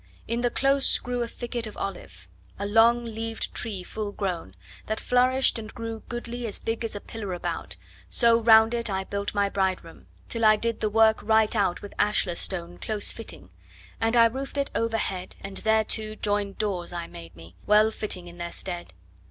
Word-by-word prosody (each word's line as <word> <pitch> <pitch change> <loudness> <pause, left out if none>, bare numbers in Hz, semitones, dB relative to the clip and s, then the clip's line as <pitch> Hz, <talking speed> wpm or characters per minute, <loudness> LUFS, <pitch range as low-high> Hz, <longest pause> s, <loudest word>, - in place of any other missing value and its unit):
In 235 +1 -1
the 245 - +2
close 275 +2 +3
grew 245 0 -3
a 235 - -1
thicket 235 -1 -4
of 215 - -10
olive, 195 - -6 0.3
a 200 - -3
long 230 +3 +4
leaved 225 0 -3
tree 205 -6 -2
full 210 +2 -5
grown, 175 - -4 0.3
That 220 0 -1
flourished 255 0 +3
and 215 -1 -8
grew 225 -2 -6
goodly 240 0 -4
as 210 - 0
big 225 +1 -3
as 225 -2 -3
a - - -3
pillar 205 -3 -6
about, 175 - -3 0.3
So 235 -1 +4
round 220 0 +7
it 235 -1 -1
I 190 -1 -1
built 200 +1 -4
my 200 0 +3
bride 190 -2 0
room, 165 -1 -14 0.2
till 230 -1 -3
I 215 0 +7
did 230 +1 -1
the 215 - 0
work 220 +1 +4
right 220 0 +3
out 200 -4 +1
With 205 - -8
ashlar 205 -3 +2
stone 175 -1 -3
close 215 -2 -1
fitting; 225 - -8 0.5
and 225 +1 +1
I 230 -1 +8
roofed 265 +5 -2
it 280 0 0
overhead, 225 -5 -1
And 195 0 -7
thereto 220 0 +1
joined 205 -2 -1
doors 190 -5 -2
I 170 -1 -4
made 85 - -11
me, 85 +1 -13
well 215 +1 +5
fitting 185 -5 -2
in 175 0 -12
their 170 0 -4
stead. 175 - -6
220 Hz, 195 wpm, -26 LUFS, 195-230 Hz, 0.5 s, I